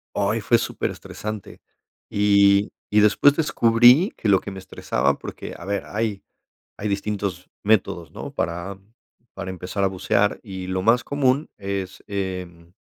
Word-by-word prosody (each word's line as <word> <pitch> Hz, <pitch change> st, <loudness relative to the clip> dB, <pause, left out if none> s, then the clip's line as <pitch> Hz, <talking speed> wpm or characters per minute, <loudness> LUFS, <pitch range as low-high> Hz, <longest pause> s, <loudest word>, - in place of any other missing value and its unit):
Ay, 105 Hz, +3 st, +1 dB
fue 115 Hz, +2 st, +3 dB
superestresante 105 Hz, -2 st, -5 dB, 0.5 s
y 100 Hz, 0 st, +4 dB, 0.2 s
y 105 Hz, -, +4 dB
después 105 Hz, +7 st, +5 dB
descubrí 120 Hz, -, +5 dB
que 110 Hz, -, -3 dB
lo 95 Hz, -2 st, +5 dB
que 100 Hz, -, -7 dB
me 95 Hz, -, -8 dB
estresaba 70 Hz, -6 st, -1 dB
porque -, -, -8 dB
a -, -, -11 dB
ver, 100 Hz, 0 st, -2 dB
hay 105 Hz, -2 st, -3 dB, 0.5 s
hay 105 Hz, -, -3 dB
distintos 100 Hz, -3 st, -3 dB
métodos, 95 Hz, -5 st, +1 dB
¿no? -, -, -8 dB
Para 85 Hz, +3 st, -3 dB, 0.5 s
para 95 Hz, -, -6 dB
empezar 95 Hz, +2 st, -4 dB
a -, -, +4 dB
bucear, 100 Hz, +2 st, +1 dB
y 95 Hz, -3 st, -7 dB
lo 95 Hz, 0 st, -1 dB
más 115 Hz, +3 st, +4 dB
común 140 Hz, +1 st, +1 dB
es, 100 Hz, -1 st, -4 dB
em, 90 Hz, -4 st, -5 dB
100 Hz, 145 wpm, -23 LUFS, 95-110 Hz, 0.5 s, después